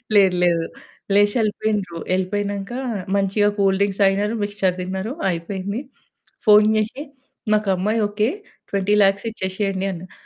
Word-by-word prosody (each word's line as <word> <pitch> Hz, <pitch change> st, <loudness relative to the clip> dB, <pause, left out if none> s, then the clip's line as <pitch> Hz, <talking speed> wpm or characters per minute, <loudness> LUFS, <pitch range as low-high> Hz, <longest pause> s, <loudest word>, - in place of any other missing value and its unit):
లేదు, 190 Hz, -3 st, +5 dB
లేదు. 170 Hz, -2 st, +2 dB, 0.5 s
లేషెళ్ళిపోయిండ్రు. 205 Hz, -3 st, +1 dB, 0.2 s
ఎళ్ళిపోయినంక 200 Hz, +2 st, -2 dB, 0.4 s
మంచిగా 200 Hz, +1 st, +2 dB
కూల్ 195 Hz, -1 st, +3 dB
డ్రింక్స్ 200 Hz, 0 st, 0 dB
తాగినారు, 200 Hz, +3 st, +2 dB
మిక్స్చర్ 205 Hz, -3 st, 0 dB
తిన్నారు. 190 Hz, +4 st, -4 dB, 0.2 s
అయిపోయింది. 190 Hz, +5 st, -3 dB, 0.7 s
ఫోన్ 210 Hz, 0 st, +7 dB
చేసి, 220 Hz, +7 st, -2 dB, 0.5 s
"మాకు 210 Hz, -2 st, +1 dB
అమ్మాయి 215 Hz, +5 st, 0 dB
ఓకే, 210 Hz, +2 st, +1 dB, 0.4 s
2000000 200 Hz, +1 st, +2 dB
ఇచ్చేసేయండి" 195 Hz, -1 st, -2 dB
అన్నారు. 180 Hz, +1 st, -10 dB
200 Hz, 110 wpm, -21 LUFS, 190-210 Hz, 0.7 s, ఫోన్